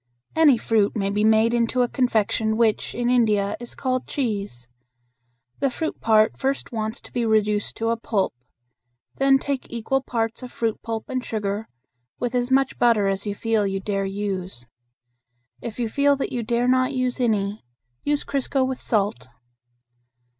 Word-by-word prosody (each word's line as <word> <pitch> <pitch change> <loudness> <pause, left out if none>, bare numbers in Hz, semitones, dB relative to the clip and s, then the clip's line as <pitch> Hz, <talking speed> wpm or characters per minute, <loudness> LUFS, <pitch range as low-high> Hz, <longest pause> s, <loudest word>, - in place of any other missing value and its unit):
Any 310 -6 +6
fruit 220 -2 +1
may 200 -1 0
be 210 +1 +1
made 220 +1 +4
into 240 +1 +2
a - - +1
confection 220 -3 +1
which, 225 -2 +1
in 240 0 -1
India, 215 -5 +2
is 240 0 -9
called 255 -1 -1
"cheese." 200 - -3 0.9
The 275 - +2
fruit 315 +5 -4
part 215 -1 +3
first 270 +1 -1
wants 220 -1 -3
to - - -14
be 245 - 0
reduced 210 -2 +1
to 225 0 0
a 230 - +1
pulp. 215 -4 -1 0.8
Then 270 0 +5
take 270 -1 -4
equal 235 +3 0
parts 230 -2 -2
of 250 -1 -8
fruit 225 -1 -2
pulp 225 -1 -4
and 255 -1 -2
sugar, 210 -1 -3 0.5
with 245 0 -2
as 245 0 0
much 270 0 +2
butter 230 -4 +4
as 195 +1 -1
you 205 - -2
feel 220 -2 +1
you 195 0 -2
dare 195 0 -2
use. 190 -9 -4 1.0
If 235 0 -6
you 235 - 0
feel 280 +5 +3
that 275 - -3
you 245 - -2
dare 235 +2 0
not 255 +2 +3
use 255 0 -1
any, 210 -3 0 0.4
use 290 0 0
crisco 270 -1 0
with 260 -1 -4
salt. 210 - 0
230 Hz, 170 wpm, -23 LUFS, 210-255 Hz, 1.0 s, Any